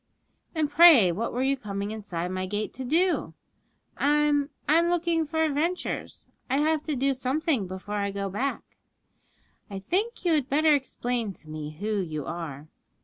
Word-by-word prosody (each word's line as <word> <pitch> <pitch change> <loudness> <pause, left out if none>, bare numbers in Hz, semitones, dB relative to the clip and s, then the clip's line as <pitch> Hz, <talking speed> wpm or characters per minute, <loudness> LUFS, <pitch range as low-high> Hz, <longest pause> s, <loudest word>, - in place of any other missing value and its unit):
'And 310 -2 +1
pray 290 - +7
what 220 +7 -2
were 250 +2 -1
you 275 +1 +2
coming 200 -4 -5
inside 185 -5 -4
my 185 0 -3
gate 205 +2 -3
to 265 - -5
do?' 340 +8 +1 0.6
'I'm 295 0 +2 0.2
I'm 330 +3 +4
looking 340 -2 +1
for 320 +1 0
adventures; 320 +4 -2 0.2
I 265 - +2
have 310 +1 +2
to 305 - -1
do 270 +2 +1
something 265 - 0
before 190 +3 -5
I 200 0 -1
go 200 0 -3
back.' 245 +9 -4 0.9
'I 200 - -6
think 415 +3 0
you 340 - +3
had 285 -4 +1
better 305 +2 +4
explain 245 -5 -2
to 155 - -12
me 155 0 -6
who 210 0 -1
you 155 -6 -4
are.' 155 -3 -6
260 Hz, 165 wpm, -27 LUFS, 200-310 Hz, 0.9 s, pray